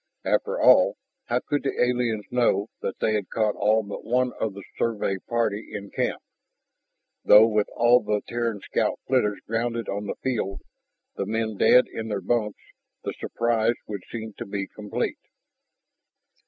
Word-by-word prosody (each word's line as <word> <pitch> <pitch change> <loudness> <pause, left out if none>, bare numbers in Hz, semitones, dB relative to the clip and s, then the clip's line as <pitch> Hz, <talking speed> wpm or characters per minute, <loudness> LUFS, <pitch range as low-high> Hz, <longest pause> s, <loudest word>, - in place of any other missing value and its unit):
After 475 +2 0
all, - - +6 0.3
how - - 0
could 145 -1 -1
the 135 - -3
aliens 120 -3 +1
know 120 -4 +2
that 95 - -3
they 110 - +1
had 105 -3 -1
caught 110 -2 +1
all 110 +2 +2
but 100 0 -7
one 125 +1 +1
of 105 -3 -2
the 100 - -8
Survey 105 -4 -1
party 115 -3 -1
in 100 -1 -7
camp? - - -1 1.0
Though 105 +2 +8
with 105 -2 +1
all 120 +1 +5
the 105 -1 -1
Terran 115 -4 -2
scout - - -1
flitters 105 -6 +1
grounded 115 +1 -2
on 100 +1 -3
the - - -3
field, 110 -7 -2 0.6
the 95 - -2
men 110 0 -1
dead 125 +5 +6
in 110 - -6
their 105 -2 -2
bunks, 105 +2 -1 0.4
the - - -3
surprise 115 0 +1
would 100 -3 -5
seem 110 -2 -6
to - - -4
be 100 0 -3
complete. 105 +1 -4
110 Hz, 160 wpm, -25 LUFS, 105-120 Hz, 1.0 s, Though